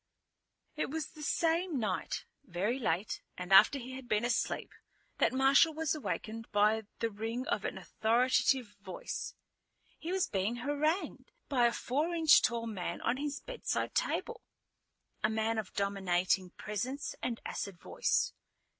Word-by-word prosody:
It 305 - -1
was 315 +2 -3
the 310 - -12
same 335 +1 +1
night, 190 -7 -2 0.2
very 200 +9 -1
late 200 -3 -1 0.2
and 180 +1 -2
after 235 +8 +8
he 255 -1 -7
had 260 -1 -8
been 215 +2 +2
asleep, 245 - -1 0.5
that - - +4
Marshal 270 +4 +5
was 320 -2 0
awakened 225 -7 -4
by 210 +1 +3
the 230 - -1
ring 225 +5 -3
of - - 0
an - - -3
authoritative 240 0 +2
voice. 190 -3 -5 0.6
He 335 - -4
was 380 -1 +2
being 200 +4 -1
harangued 290 - -1 0.2
by 245 -4 +4
a - - +1
four 300 +9 -1
inch 320 -2 +7
tall 235 -1 0
man 205 -6 -4
on 240 +2 +1
his 290 0 -3
bedside - - -2
table, - - -1 0.8
a 215 - +4
man 220 0 0
of 210 - -5
dominating 190 -2 +1
presence 255 +8 -3
and 235 -2 -2
acid 195 -3 -4
voice. - - 0
235 Hz, 145 wpm, -32 LUFS, 210-290 Hz, 0.8 s, after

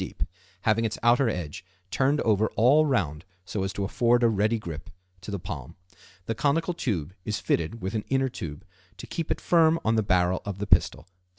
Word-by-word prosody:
deep, - - -4 0.4
having 110 +2 +2
its 110 -1 -1
outer 120 +1 +4
edge 90 -3 -5 0.3
turned 140 +2 +2
over 110 0 +2
all 140 +7 +5
round 85 - 0 0.2
so 100 - -3
as 95 0 -1
to 100 - -3
afford 120 +4 +2
a - - +6
ready 110 +2 +1
grip 85 -8 -7 0.3
to - - -9
the 100 - -2
palm. 85 - -7 0.5
The 115 - -1
conical 155 +8 +1
tube 95 - -2
is 105 0 -2
fitted 85 +6 -1
with 95 - -3
an 110 -2 -2
inner 135 0 +2
tube 75 -10 -7 0.3
to - - -8
keep 165 -2 -4
it - - -1
firm 165 -1 +4
on 110 0 +2
the - - +4
barrel 90 -2 +2
of 100 -2 -5
the 105 - -3
pistol. - - +2
110 Hz, 200 wpm, -26 LUFS, 95-125 Hz, 0.5 s, a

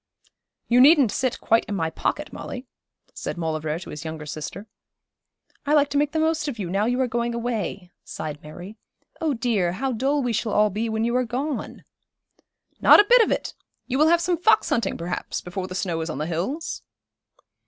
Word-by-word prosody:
'You 245 +1 +5
needn't 280 -5 +6
sit 255 -2 -1
quite 225 +1 +3
in 205 - -4
my 160 -4 -1
pocket, 300 - -3
Molly,' 255 +1 -7 0.5
said - - -5
Maulevrier 155 -2 -2
to 175 - -9
his 150 +1 -7
younger 160 -1 -6
sister. 155 +7 -6 1.0
'I 295 - +4
like 290 -1 +4
to 285 - -1
make 295 0 +1
the 320 - -2
most 315 -1 +1
of 270 -5 -4
you, 185 -5 -4
now 200 +3 +1
you 245 +2 0
are 260 - +2
going 235 0 -1
away,' 210 -6 -3
sighed 150 -1 -6
Mary. 175 +8 -10 0.4
'Oh, 310 -4 +1
dear, 220 -7 0
how 265 +7 -2
dull 270 +4 0
we 245 -2 0
shall 220 -1 -1
all 210 0 +3
be 220 +4 -2
when 220 0 -1
you 235 +1 0
are 255 - +3
gone.' 260 +5 -4 1.0
'Not - - +8
a - - +8
bit - - +7
of 450 - +3
it! - - -2 0.3
You 265 +1 -2
will 305 - +6
have 340 +1 +4
some 345 -1 0
fox 440 - +4
hunting, 235 - 0
perhaps, 175 +1 -4
before 185 +1 -5
the 185 - -7
snow 170 -3 -2
is 160 - -4
on 155 - -4
the 150 - -2
hills.' 185 - -3
230 Hz, 205 wpm, -24 LUFS, 180-275 Hz, 1.0 s, Not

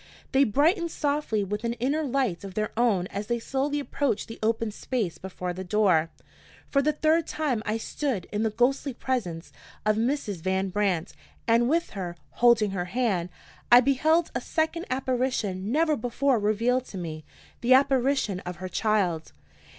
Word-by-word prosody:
They 275 +1 +5
brightened 330 - +2
softly 285 -9 -1
with 210 +3 -4
an 235 0 0
inner 265 +6 0
light 255 - -1
of 195 -1 -8
their 215 -1 -1
own 220 -6 +2
as 200 +1 -4
they 235 - 0
slowly 275 +5 -1
approached 280 -4 -1
the 225 - -9
open 225 0 0
space 210 -5 -3
before 180 -1 -5
the 185 +1 -6
door. 180 -4 +2 0.6
For 275 - +4
the 300 +2 +2
third 315 +2 +2
time 280 -8 -1
I 215 +1 0
stood 235 - -3
in 210 - -1
the 220 - +2
ghostly 250 +4 0
presence 185 -12 -3 0.3
of 215 0 +3
Mrs. 230 -4 -1
Van 190 +2 0
Brandt; 185 -4 0 0.3
and 235 +1 +4
with 335 +3 +1
her, 180 -4 -5 0.2
holding 230 -4 +4
her 180 -2 -2
hand, 190 -4 0 0.4
I 240 - +10
beheld 310 +6 +2
a - - -2
second 325 +1 -1
apparition 250 -7 -1
never 310 +2 +3
before 245 +2 +1
revealed 230 +5 +1
to 195 - -9
me, 160 -3 -5 0.4
the 250 +2 +5
apparition 265 -6 +2
of 180 -1 -6
her 185 +2 -6
child. 180 -6 0
230 Hz, 165 wpm, -26 LUFS, 195-275 Hz, 0.6 s, I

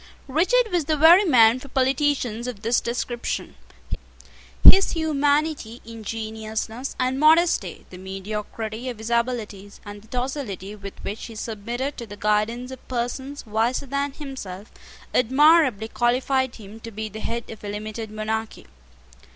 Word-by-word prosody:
Richard 405 - +2
was 345 -4 +1
the 310 0 +1
very 340 +7 +8
man 240 -6 +6
for 275 - -11
politicians 260 -3 0
of 225 -5 -6
this 230 +2 +2
description. 240 0 -3 1.1
His 390 +1 +8
humanity, 295 -6 0
ingenuousness, 220 +2 -5
and 255 +1 0
modesty, 325 +3 +3
the 180 - -10
mediocrity 210 +5 -5
of 240 - -6
his 220 +2 -6
abilities, 225 -4 -2
and 205 0 -8
the 220 - -19
docility 245 - -4
with 200 -1 -9
which 210 +3 -5
he 230 - -10
submitted 235 +6 -4
to 235 - -6
the 205 0 -9
guidance 215 +5 0
of 260 - -11
persons 260 +3 -4
wiser 225 +5 0
than 280 +1 -2
himself, 225 -10 -8 0.4
admirably 265 -3 +4
qualified 255 +2 +1
him 215 0 -11
to 230 - -8
be 220 0 -5
the 215 +1 -8
head 235 +1 -4
of 220 - -11
a 205 - -4
limited 215 +2 -5
monarchy. 215 +1 -4
235 Hz, 145 wpm, -24 LUFS, 215-270 Hz, 1.1 s, very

